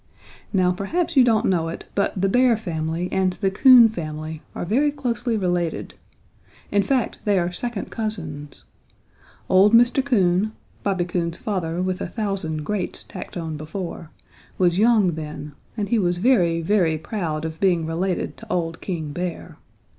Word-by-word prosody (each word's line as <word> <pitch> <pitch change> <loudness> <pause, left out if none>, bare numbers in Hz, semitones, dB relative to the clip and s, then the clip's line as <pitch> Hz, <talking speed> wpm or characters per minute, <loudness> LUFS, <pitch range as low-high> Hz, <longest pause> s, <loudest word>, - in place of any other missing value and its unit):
"Now 185 -3 +3
perhaps 325 - -2
you 265 - +7
don't 225 -3 +3
know 170 -3 +1
it, 165 - -7
but 200 -1 0
the 195 - +2
Bear 245 +2 +4
family 165 -3 -3
and 190 -1 +1
the 195 0 -1
Coon 245 +3 +8
family 155 -5 -6
are - - -3
very 270 - +2
closely 240 -4 -1
related. 175 -4 -1 0.8
In 205 - +3
fact, 255 +3 0
they 205 -2 +2
are 175 0 0
second 230 +3 -5
cousins. 160 - -5 0.8
Old 195 +3 +5
Mr. 240 +3 +4
Coon, 205 -5 +2 0.3
Bobby 190 -3 0
Coon's 170 -1 -2
father 180 -4 -2
with 185 0 -2
a - - -2
thousand 195 -8 -3
greats 195 +3 -3
tacked - - -8
on 160 -2 -4
before, 165 +1 -6 0.5
was 180 0 +2
young 220 -4 +4
then, 150 -1 -6 0.3
and 205 -2 -2
he 235 - +2
was 175 -2 +1
very, 175 -6 +3
very 170 -4 +2
proud 160 -3 -3
of 160 0 -6
being 175 -4 +2
related 175 +3 -2
to 225 -1 -11
old 165 -2 -2
King 160 -6 -4
Bear. 175 +2 -5
185 Hz, 160 wpm, -23 LUFS, 165-215 Hz, 0.8 s, Coon